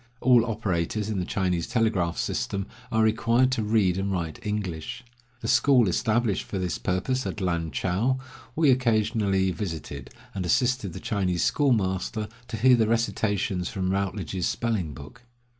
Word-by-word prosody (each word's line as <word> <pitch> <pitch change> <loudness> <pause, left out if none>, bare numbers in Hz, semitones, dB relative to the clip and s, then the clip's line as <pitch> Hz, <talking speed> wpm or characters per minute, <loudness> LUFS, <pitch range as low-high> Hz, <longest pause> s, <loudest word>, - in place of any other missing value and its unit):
All 125 -2 +5
operators 105 -1 -1
in 100 - -1
the 90 - -1
Chinese 90 -3 0
telegraph 100 -7 +1
system 100 -1 -2 0.3
are 110 0 +3
required 115 +3 +3
to 125 - 0
read 105 -4 +2
and 100 0 -1
write 85 -4 -3
English. 105 0 -4 0.4
The - - -4
school 130 -6 +4
established 110 +2 +1
for 100 - -5
this 90 -2 -2
purpose 125 +9 -1
at - - -4
Lan 85 -4 -1
chou 95 - 0 0.4
we 155 -3 +4
occasionally 110 -6 +2
visited, 80 -7 -5 0.2
and 95 - -3
assisted 125 0 +1
the 95 - -6
Chinese 90 -4 -1
schoolmaster 110 - +1 0.2
to 115 - -5
hear 125 +3 +6
the 110 -2 +2
recitations 105 -5 0
from 95 -1 -2
Routledge's 95 -2 -2
spelling 100 - -2
book. 70 - -12
100 Hz, 150 wpm, -26 LUFS, 90-115 Hz, 0.4 s, hear